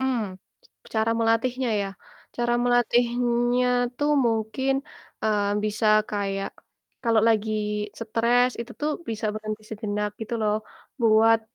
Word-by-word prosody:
Mmm, 260 -2 +1 0.7
cara 220 +1 +2
melatihnya 240 +3 +1
ya, 200 - -2 0.5
cara 240 0 +1
melatihnya 245 0 +2 0.3
tuh 290 +2 +1 0.2
mungkin, 225 +4 0 0.5
eee, 210 -2 +1
bisa 215 +1 0 0.2
kayak 195 -1 -2 0.5
kalo 230 -1 +3
lagi 220 -1 +2 0.5
stress, 235 +2 +2
itu 235 - -7
tuh 300 +1 0 0.2
bisa 220 0 -2
berhenti 215 0 -5
sejenak 210 -1 -2
gitu 220 +1 -4
loh, 210 -1 +2 0.5
buat, 225 0 +5
225 Hz, 115 wpm, -25 LUFS, 215-240 Hz, 0.7 s, buat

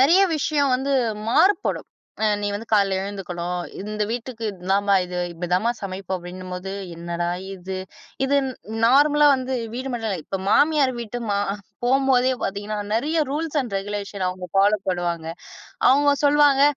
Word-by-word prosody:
நிறைய 330 +9 +6 0.2
விஷயம் 285 -2 +1
வந்து 275 +2 -2 0.4
மாறுபடும். 390 - +2 0.4
"அ - - +4
நீ 205 - -1
வந்து 225 +3 -5
காலையில 195 -2 +3
எழுந்துக்கணும், 180 -3 -4 0.2
இந்த 210 +1 -3
வீட்டுக்கு 240 -1 -6
இதுதான்மா 195 +2 +1
இது, 180 0 -5
இப்படிதான்மா 180 +6 0
சமைப்போம்" 190 -1 -4
அப்படின்னும்போது 180 +1 -7 0.2
என்னடா 170 0 -3 0.3
இது. 190 0 -6 0.5
இது 280 +1 +2 0.5
நார்மலா 295 +3 +5
வந்து 260 0 -2 0.2
வீடு 260 +2 -4
மட்டும் 225 -2 -2
இல்லை. 185 - -2
இப்ப 195 - -3
மாமியார் 295 -3 +4
வீட்டு 235 +1 -5
மா 200 - +1 0.5
போகும்போதே 260 0 +3
பாத்தீங்கன்னா, 205 +2 -3 0.2
நிறைய 300 +8 0
ரூல்ஸ் 310 +1 -1
அண்ட் 230 -6 -6
ரெகுலேஷன் 200 -1 -4
அவங்க 180 0 -6
ஃபாலோ 205 +2 +4
பண்ணுவாங்க. 175 -2 -2 0.6
அவங்க 285 +2 +5
சொல்லுவாங்க, 285 -1 +5
205 Hz, 140 wpm, -23 LUFS, 185-270 Hz, 0.6 s, நிறைய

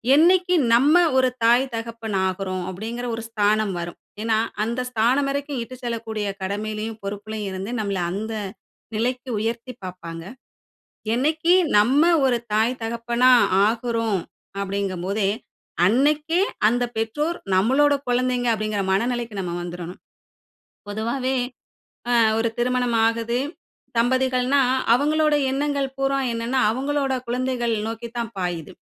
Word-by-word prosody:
"என்னிக்கு 360 +3 +4 0.2
நம்ம 285 +7 +5 0.2
ஒரு 255 -1 +4 0.2
தாய், 240 +3 +5
தகப்பன் 225 -3 -4
ஆகுறோம்?" 185 0 -3
அப்டிங்கிற 230 +6 -5
ஒரு 225 - -6
ஸ்தானம் 210 -2 +1
வரும். 170 0 -6 0.2
ஏன்னா, 225 -1 +2 0.3
அந்த 235 +2 -2
ஸ்தானம் 250 +5 +2
வரைக்கும் 280 -2 -3
இட்டு 255 +2 -10
செல்லக்கூடிய 225 -3 -3 0.2
கடமையிலயும், 215 +2 -4
பொறுப்புலயும் 205 0 -4
இருந்து 195 +5 -5
நம்மள 200 -3 -1
அந்த 220 +4 -4 0.6
நிலைக்கு 250 +3 -2
உயர்த்தி 230 +3 -3
பாப்பாங்க. 170 -2 -8 0.9
என்னைக்கு 310 +7 +2 0.2
நம்ம 255 +8 +4 0.2
ஒரு 245 -2 +3 0.2
தாய், 220 +4 +3
தகப்பனா 235 +2 +1 0.4
ஆகுறோம்? 230 -3 0 0.4
அப்டிங்கும் 195 -2 -3
போதே, 200 0 +1 0.6
அன்னைக்கே 300 - +2 0.3
அந்த 245 +2 +2
பெற்றோர், 295 +10 -1 0.2
நம்மளோட 270 +9 +4
குழந்தைங்க 245 0 +1
அப்டிங்கிற 215 -2 -1
மனநிலைக்கு 235 +2 -1
நம்ம 180 -2 -3
வந்துரணும். 175 0 -7 0.9
பொதுவாவே, 235 +5 -2 0.7
அ - - +2 0.2
ஒரு 230 0 +1
திருமணம் 245 -1 +1
ஆகுது. 230 +1 -1 0.6
தம்பதிகள்னா, 255 +2 +2 0.3
அவங்களோட 300 +3 +3 0.2
எண்ணங்கள் 280 0 -1
பூரா 270 0 +1 0.2
என்னன்னா, 235 +3 -1
அவங்களோட 275 +2 -1
குழந்தைகள் 245 -1 -1
நோக்கித்தான் 235 0 -5
பாயுது. 175 -4 -3
235 Hz, 115 wpm, -23 LUFS, 215-260 Hz, 0.9 s, நம்ம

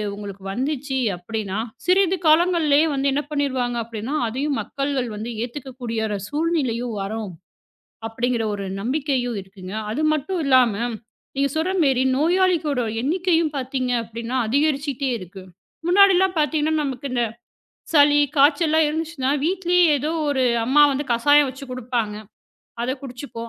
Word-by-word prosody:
உங்களுக்கு 200 -1 -9
வந்துச்சு 270 +3 -2 0.2
அப்டின்னா 205 +2 -4 0.3
சிறிது 375 0 +3
காலங்கள்லயே 315 -2 +4
வந்து 275 0 +1
என்ன 290 +2 0
பண்ணிருவாங்க, 260 -4 -1
அப்டின்னா 230 +5 -5
அதையும் 275 +5 -2
மக்கள்கள் 275 -3 -2
வந்து 220 +3 -5
ஏத்துக்கக்கூடியரா 240 -4 -4
சூழ்நிலையும் 270 -8 -1
வரும் 205 0 -4 0.8
அப்படிங்கிற 235 0 -1
ஒரு 200 -1 -5
நம்பிக்கையும் 255 -1 -1
இருக்குங்க. 190 0 -10 0.2
அது 300 +7 -1
மட்டும் 320 +5 -2
இல்லாம 255 -5 +4 0.6
நீங்க 280 0 +1
சொல்ற 330 +4 0
மேரி 265 -2 +2
நோயாளிக்கூட 330 -3 +2 0.2
எண்ணிக்கையும் 330 +1 +1
பாத்தீங்க 255 -1 -2
அப்டின்னா 230 +2 -6
அதிகரிச்சுக்கிட்டே 280 -1 0
இருக்கு. 185 +1 -10 0.4
முன்னாடில்லாம் 380 0 +5
பாத்தீங்கன்னா, 305 +1 +1
நமக்கு 275 0 -4
இந்தச் 240 -3 -1 0.6
சளி, 290 -1 +6 0.2
காய்ச்சல்லாம் 310 +2 +4
இருந்துச்சுன்னா 305 -3 -2
வீட்டிலயே 360 0 +2
ஏதோ 300 +4 -2 0.2
ஒரு 265 -2 +1 0.2
அம்மா 280 +5 +4
வந்து 275 +1 -1
கசாயம் 290 +4 +4
வச்சு 270 +2 -9
கொடுப்பாங்க. 240 -4 -2 0.7
அதக் 260 +2 -2
குடிச்சுப்போம். 245 -3 -8
270 Hz, 125 wpm, -22 LUFS, 235-305 Hz, 0.8 s, சளி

